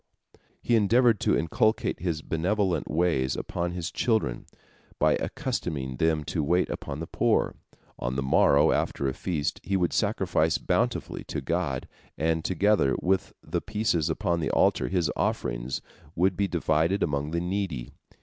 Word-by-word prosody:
He 120 - +3
endeavored 115 +1 +4
to - - +2
inculcate 110 +7 +1
his 80 -4 -2
benevolent 90 +1 0
ways 75 -5 +1
upon 85 0 -3
his 90 -1 -4
children, 110 - 0 0.5
by - - +3
accustoming 65 -3 -3
them 80 0 +1
to 75 +2 -2
wait 90 +5 +1
upon 70 - -5
the 80 - -4
poor. - - +1 0.5
On 60 +1 -2
the 70 - -1
morrow 70 +3 +4
after 70 - 0
a 65 - -1
feast 80 -3 -2
he 95 0 0
would 90 -2 0
sacrifice - - +1
bountifully - - -1
to - - -4
God, 80 -7 -2 0.3
and 80 +1 0
together 95 -6 +2
with 95 +1 0
the - - -2
pieces 105 -7 0
upon 85 -1 0
the 80 - -1
altar - - +2
his 90 -5 0
offerings - - -2 0.3
would 90 +2 +2
be 100 +1 +1
divided 85 +2 +1
among 70 -1 -1
the 85 +2 -1
needy. 90 -8 -3
85 Hz, 150 wpm, -27 LUFS, 75-95 Hz, 0.5 s, endeavored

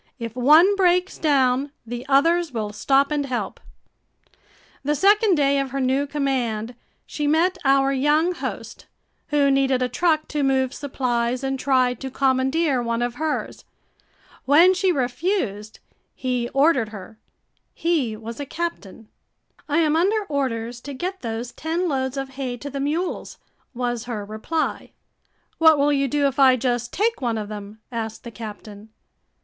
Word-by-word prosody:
If 230 -2 -6
one 310 +10 +6
breaks 365 -1 +2
down, 275 -2 +2
the 240 +3 -6
others 330 +4 +3
will 215 -3 -4
stop 275 +6 +2
and 290 -2 -1
help. 250 -2 -3 1.2
The 295 +2 0
second 410 +3 +4
day 280 -2 +2
of 275 -1 -2
her 275 +2 -3
new 265 +2 +1
command, 250 -6 -2 0.3
she 295 -1 -3
met 350 +5 +2
our 275 0 +3
young 295 +6 +2
host, 350 - -6 0.4
who 285 -2 +2
needed 270 -2 +2
a - - +1
truck 310 +5 +1
to 300 - -2
move 265 -1 +1
supplies 250 -3 -2
and 270 0 -2
tried 255 -3 +2
to 265 - -5
commandeer 265 +2 +1
one 235 0 -1
of 240 0 -2
hers. 315 -1 -3 0.8
When 330 +7 +6
she 375 0 +1
refused, 250 - -2 0.4
he 250 -2 -2
ordered 275 -5 +2
her. 215 +1 -11 0.5
He 290 -11 -1
was 230 +3 -8
a 285 - -4
captain. 255 - -5 0.6
"I 295 - +1
am 310 -1 +2
under 405 +6 +2
orders 240 -4 -2
to 280 +1 -7
get 370 +7 -4
those 230 +1 -4
ten 335 +3 -2
loads 265 -3 -2
of 270 0 -3
hay 260 -2 -5
to 285 +4 -7
the 280 - -4
mules," 315 +6 -3 0.4
was 240 -1 -2
her 220 -4 -5
reply. 220 +10 -3 0.7
"What 320 -1 +6
will 290 +1 +3
you 275 -1 +1
do 285 +2 +1
if 275 0 -1
I 260 -2 +7
just 240 -1 -1
take 445 -2 0
one 235 -3 -1
of 210 -1 -5
them?" 210 0 -9
asked 225 -2 -5
the 235 - -8
captain. 215 -1 -10
270 Hz, 155 wpm, -23 LUFS, 240-300 Hz, 1.2 s, I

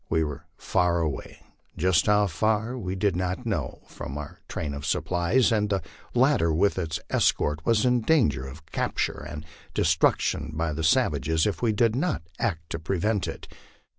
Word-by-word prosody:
We 80 0 +2
were 75 -2 -6
far 90 -1 +1
away 80 -4 -4 0.3
jus* 90 0 +3
how 105 0 +4
far 110 +6 0
we 95 -6 -4
did 95 -1 +1
not 90 +6 -2
know 85 - -3
from 70 - -7
our 75 -1 -8
train 75 -2 -4
of 70 0 -6
supplies, 90 - +2
and 105 -2 +1
the 95 -4 0 0.3
latter 125 - +4
with 95 +5 +2
its 80 -2 -2
escort 75 +2 +1
was 115 -1 +3
in 125 -1 +3
danger 75 - +2
of 75 +4 -11
capture 80 - -2
and 75 0 -7 0.3
destruction 75 +1 +2
by 80 0 -1
the 80 +2 -3
savages 80 0 +2
if 105 - -1
we 115 -2 +2
did 110 +1 +2
not 145 - -1 0.2
act 80 -8 -2
to - - -2
prevent 95 +5 0
it. - - -7
90 Hz, 170 wpm, -26 LUFS, 80-110 Hz, 0.3 s, how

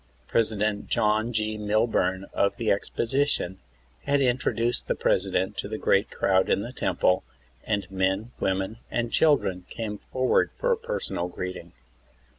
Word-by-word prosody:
President 105 -2 0
John 110 +2 +2
G. 110 -1 -1
Milburn 105 -3 +1
of 100 +1 +1
the 115 -3 +1
Exposition 115 -2 0 0.5
had 145 0 +2
intro 130 -1 +2
duced 120 +1 -1
the - - +1
President 95 0 +1
to - - -3
the 110 +1 -4
great 100 0 +2
crowd 95 -1 +2
in - - +2
the 120 +4 -6
Temple, 90 -7 +1 0.4
and 105 -3 0
men, 95 +4 0
w^omen 95 +3 -1
and 120 -1 -1
children 95 - +2
came 105 -2 -5
forward 130 0 +1
for - - 0
a - - +5
personal 465 - -2
greeting. 90 +1 -6
105 Hz, 145 wpm, -26 LUFS, 95-120 Hz, 0.5 s, a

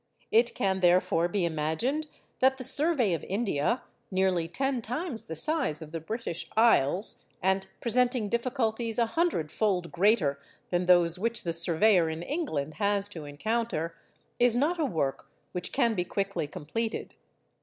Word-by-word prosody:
It 235 +2 +3
can, 190 -1 0
therefore, 175 -2 +3
be 180 0 0
imagined 165 - -1 0.3
that 265 +1 +4
the 260 - -6
survey 270 - +3
of 165 - -3
India—nearly 190 - -1
ten 265 +8 -1
times 245 - -3
the 160 - -6
size 270 - +1
of 155 -2 -9
the 165 - -4
British 175 0 -5
Isles, 200 - +3 0.2
and 190 +1 +1
presenting 245 -1 +2
difficulties 235 -1 -1
a 235 - +3
hundredfold 205 - 0
greater 175 -7 +2 0.3
than 175 0 0
those 175 -1 +5
which 230 +3 -2
the 170 - -1
surveyor 170 +1 +3
in 160 +1 -4
England 165 - -3
has 200 0 +2
to 165 -7 -8
encounter—is 215 +5 -2
not 310 +8 +1
a 315 - +2
work 155 - -2 0.2
which 180 - -3
can 240 -4 +2
be 180 -4 0
quickly 195 -4 -2
completed. 225 +11 -4
200 Hz, 145 wpm, -28 LUFS, 170-235 Hz, 0.3 s, those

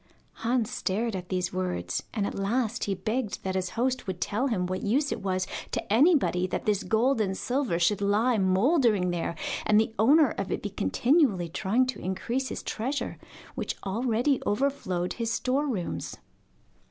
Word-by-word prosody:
Hans 235 -1 +1
stared 215 +3 -1
at 180 -1 -6
these 180 -1 -1
words, 185 -1 -2
and 210 -3 -1
at - - -3
last 225 +3 -1
he 200 - -1
begged 220 +4 -3
that 190 - -2
his 185 -1 -1
host 255 0 0
would 185 -2 -3
tell 225 +9 0
him 200 -8 0
what 185 +1 -3
use 275 +8 +1
it - - -3
was 185 -1 -1 0.2
to - - -2
anybody 260 - +4
that 180 - -3
this 210 -2 +2
gold 230 +2 +2
and 190 -2 -1
silver 250 -8 0
should 185 +4 +2
lie 215 +4 +2
mouldering 200 - +3
there, 170 -1 -2 0.3
and 210 0 +4
the 220 0 0
owner 280 +4 +5
of 195 - -4
it - - -2
be 205 - -3
continually 205 - +2
trying 215 +10 +1
to 255 - -5
increase 235 +8 -2
his - - -5
treasure, 260 +6 -3 0.3
which - - -3
already 240 +6 +1
overflowed 205 -7 -1
his 230 -1 -2
store 265 +5 0
rooms. 200 -10 -3
215 Hz, 175 wpm, -27 LUFS, 190-255 Hz, 0.3 s, owner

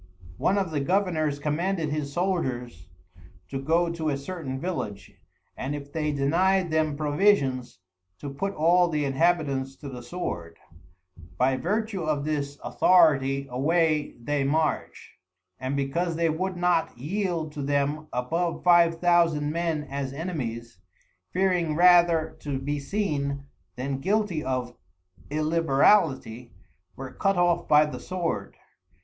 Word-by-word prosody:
One 195 - +2
of 190 -4 -1
the 150 - -1
Governours 160 -2 0
commanded 160 +3 -1
his 145 -1 -3
Soldiers 130 - -2 0.6
to 135 - -4
go 165 +4 +1
to 160 -2 -2
a 140 - -1
certain 140 -3 -5
Village, 105 - -4 0.4
and 135 +3 -4
if 145 -1 -9
they 150 -2 -1
denyed 170 +6 +2
them 155 -2 +1
Provisions, 145 -5 +1 0.4
to 140 +5 -7
put 195 +8 -3
all 175 +3 +4
the 150 -2 0
Inhabitants 140 -2 +1
to 140 - -9
the 125 -2 -8
Sword: 105 - -5 0.8
By 130 +1 +2
Vertue 205 - -2
of 150 -3 -1
this 145 -2 -2
Authority 140 -6 +3
away 155 +3 +1
they 145 +3 -1
march, 155 +3 -2 0.4
and 130 +2 -2
because 165 +5 -1
they 165 -1 +1
would 185 +3 -3
not 175 -6 +1
yield 170 - -2
to 150 - -6
them 145 +2 -1
above 165 +8 -2
Five 170 -2 +5
Thousand 170 -4 +3
Men 165 -2 -1
as 140 -2 -4
Enemies, 120 - -5 0.5
fearing 180 -4 +1
rather 175 -2 +4
to 145 -2 -3
be 145 +2 -3
seen, 140 -5 -2 0.3
then 135 +1 -3
guilty 195 -1 0
of 125 -2 -3 0.5
Illiberality, 150 - +2 0.4
were 135 -1 -7
cut 195 -1 0
off 175 -1 +2
by 150 0 +6
the 150 - -6
Sword. 180 -3 -3
155 Hz, 130 wpm, -26 LUFS, 140-175 Hz, 0.8 s, by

